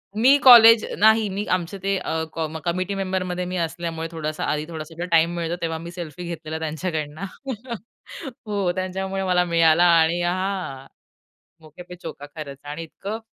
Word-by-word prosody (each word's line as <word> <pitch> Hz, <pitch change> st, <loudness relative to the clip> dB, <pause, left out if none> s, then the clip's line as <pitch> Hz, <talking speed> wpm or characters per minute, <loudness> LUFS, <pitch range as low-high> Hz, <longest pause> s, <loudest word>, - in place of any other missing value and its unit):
मी 255 Hz, +6 st, +6 dB
college 230 Hz, -3 st, +9 dB
नाही, 220 Hz, 0 st, +5 dB
मी 205 Hz, +1 st, -2 dB
आमचे 185 Hz, +2 st, -2 dB
ते 195 Hz, 0 st, +1 dB, 0.7 s
कमिटी 185 Hz, +3 st, -1 dB
मेंबरमध्ये 185 Hz, -2 st, -2 dB
मी 180 Hz, +1 st, -4 dB
असल्यामुळे 165 Hz, -1 st, -3 dB
थोडासा 155 Hz, -2 st, -4 dB
आधी, 150 Hz, 0 st, -1 dB
थोडासा 165 Hz, +1 st, -6 dB
टाईम 165 Hz, +1 st, +4 dB
मिळतो 170 Hz, 0 st, -2 dB
तेव्हा, 165 Hz, -1 st, -2 dB
मी 170 Hz, +1 st, -8 dB
सेल्फी 175 Hz, -1 st, -7 dB
घेतलेला 160 Hz, -2 st, -5 dB
त्यांच्याकडनं. 160 Hz, 0 st, -4 dB, 1.2 s
हो, 200 Hz, -4 st, 0 dB
त्यांच्यामुळे 190 Hz, +1 st, -3 dB
मला 180 Hz, -1 st, +2 dB
मिळाला 165 Hz, 0 st, +4 dB, 0.2 s
आणि 165 Hz, +2 st, +1 dB
हा, 180 Hz, -7 st, -2 dB, 0.7 s
"मौके-पे-चौका" 165 Hz, -1 st, -10 dB
खरंच 140 Hz, -3 st, -7 dB
आणि 150 Hz, +3 st, -6 dB
इतकं 200 Hz, +7 st, -6 dB
175 Hz, 135 wpm, -23 LUFS, 160-190 Hz, 1.2 s, college